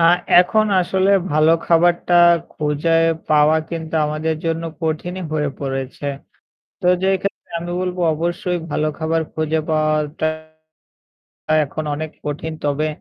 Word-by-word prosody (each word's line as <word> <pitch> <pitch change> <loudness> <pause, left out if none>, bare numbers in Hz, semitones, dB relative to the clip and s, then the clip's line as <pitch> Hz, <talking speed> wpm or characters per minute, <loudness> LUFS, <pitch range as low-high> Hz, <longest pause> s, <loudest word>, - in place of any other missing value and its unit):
আ - - +3 0.4
এখন 215 +4 +2
আসলে 190 +2 +1 0.2
ভালো 155 +1 +4
খাবারটা 175 +1 +2 0.4
খুজে 155 +2 +1 0.3
পাওয়া 155 +1 +4
কিন্তু 160 -1 -5
আমাদের 155 +1 -1
জন্য 165 0 -1 0.2
কঠিনই 175 +4 -3
হয়ে 150 -2 0
পড়েছে। 135 +1 -4 0.7
তো - - -2 0.2
যে 190 - +2
ক্ষেত্রে 200 - -5
আমি 175 +1 -6
বলব 180 0 -2 0.2
অবশ্যই 175 +2 -2
ভালো 155 +1 0
খাবার 160 0 0
খুঁজে 155 0 -1
পাওয়াটা 155 0 0 1.4
এখন 155 +3 -5
অনেক 155 +1 -4 0.2
কঠিন। 150 +2 -4
তবে 145 +2 0
160 Hz, 125 wpm, -19 LUFS, 155-170 Hz, 1.4 s, ভালো